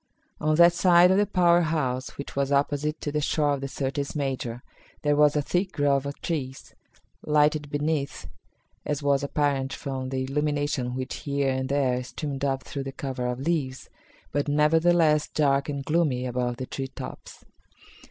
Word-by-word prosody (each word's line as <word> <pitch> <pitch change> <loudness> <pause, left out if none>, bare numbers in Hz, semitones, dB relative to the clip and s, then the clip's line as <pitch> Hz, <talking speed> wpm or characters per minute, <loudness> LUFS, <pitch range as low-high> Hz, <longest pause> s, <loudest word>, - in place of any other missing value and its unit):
On 155 0 +1
that 170 +1 +7
side 175 0 +5
of 190 - +4
the 205 0 +3
power 175 -3 +4
house 135 -6 -2
which 140 - -7
was 140 0 0
opposite 145 +2 0
to 145 - -3
the 150 0 -1
shore 150 0 +1
of 140 - -3
the 135 - -3
Syrtis 135 +1 -3
Major 130 -4 -3 0.4
there 145 0 +3
was 150 0 +4
a 150 - +1
thick 180 +5 -1
grove 140 -2 +1
of 140 - -6
trees, 135 -6 -4 0.5
lighted 150 0 +2
beneath, 145 0 -2 0.6
as 145 0 -3
was 140 0 +2
apparent 140 -2 0
from 130 -2 -4
the 130 0 -2
illumination 145 -2 -1
which 130 0 -4
here 140 -1 -1
and 130 0 -2
there 130 -3 +1
streamed 140 +2 -5
up 135 -2 0
through 140 +2 -5
the 135 - -4
cover 130 -2 -4
of 125 +1 -3
leaves, 140 -4 -2 0.4
but, 145 0 -1
nevertheless, 155 +1 +3
dark 140 -1 +1
and 140 -2 -4
gloomy 150 -6 +1
above 125 -1 -2
the 130 - -4
tree 135 +1 -5
tops. - - -10
140 Hz, 170 wpm, -26 LUFS, 135-150 Hz, 0.6 s, that